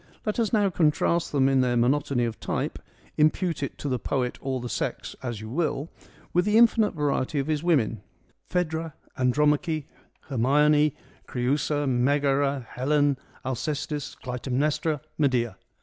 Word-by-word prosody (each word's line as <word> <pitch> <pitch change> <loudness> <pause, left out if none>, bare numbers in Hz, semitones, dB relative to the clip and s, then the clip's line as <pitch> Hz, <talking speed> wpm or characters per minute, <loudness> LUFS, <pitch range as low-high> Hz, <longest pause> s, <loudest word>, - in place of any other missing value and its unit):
Let 215 +2 -1
us 225 -3 +1
now 205 -3 +3
contrast 165 +1 +1
them 135 -2 +3
in 135 -1 +3
their 125 -1 +1
monotony 125 0 +2
of 115 -2 -4
type - - -3 0.2
— - - -30
impute 155 +1 +2
it 140 - -4
to - - -5
the 130 -2 0
poet 125 -1 -2
or 135 -1 -2
the 125 - -5
sex - - -3
as 120 -5 -4
you 110 - -7
will 155 0 -1 0.2
— - - -27
with 180 +1 +3
the 210 +1 +3
infinite 225 -3 +4
variety 145 -1 0
of 135 - +1
his 155 -1 -1
women: 135 - +1 0.5
Phaedra, 165 -3 -1 0.2
Andromache, 150 +3 +1 0.4
Her 135 - -6
mione, 150 +4 +4 0.3
Creiisa, 145 +3 0
Megara, 140 +1 +1
Helen, 145 +1 +1 0.3
Alcestis, 145 +3 -3
Clytemnestra, 135 +4 -1 0.2
Medea. 120 -8 +1
145 Hz, 150 wpm, -26 LUFS, 130-155 Hz, 0.5 s, infinite